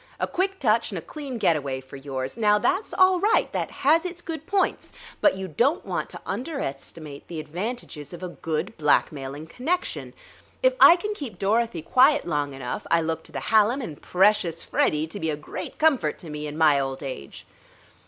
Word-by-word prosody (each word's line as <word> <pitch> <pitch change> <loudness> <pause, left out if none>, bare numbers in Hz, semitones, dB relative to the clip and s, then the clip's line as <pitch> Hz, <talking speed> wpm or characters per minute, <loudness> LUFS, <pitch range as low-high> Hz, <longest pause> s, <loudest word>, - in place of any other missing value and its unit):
A - - +1
quick 385 +1 -1
touch 230 - +2
and 195 - -5
a - - -4
clean 280 -5 -6
getaway 150 -10 +1
for 130 +1 -13
yours. 135 -1 -5
Now, 210 -2 +4
that's 370 - 0
all 370 -1 +4
right; 420 +5 +3
that - - -1
has 320 +4 +3
its 355 -1 -5
good 325 -2 -6
points, 385 0 0 0.3
but 300 - +4
you 190 0 -4
don't 245 - +1
want - - -3
to - - -10
underestimate 155 - -5
the 165 -2 -6
advantages 170 - -5
of 175 - -9
a 180 - -3
good 160 -2 -3
blackmailing 145 -1 +1
connection.... 300 - -3 0.5
If - - +5
I 340 - +10
can 420 +4 -3
keep 265 - -7
Dorothy 205 -3 0
quiet 265 - +4
long 145 -4 -1
enough, 125 -2 -5
I 170 - +4
look 160 0 -2
to - - -12
the - - -4
Hallam 220 +4 +4
and 160 - -7
precious 185 -2 +2
Freddie 150 +1 +1
to 165 +6 -7
be 160 -3 -1
a 150 - -1
great 165 +5 -7
comfort 285 - +2
to 165 - -9
me 150 0 -5
in 150 +1 -6
my 155 -3 +5
old 135 +1 -3
age." 130 - -7
185 Hz, 190 wpm, -25 LUFS, -, 0.5 s, I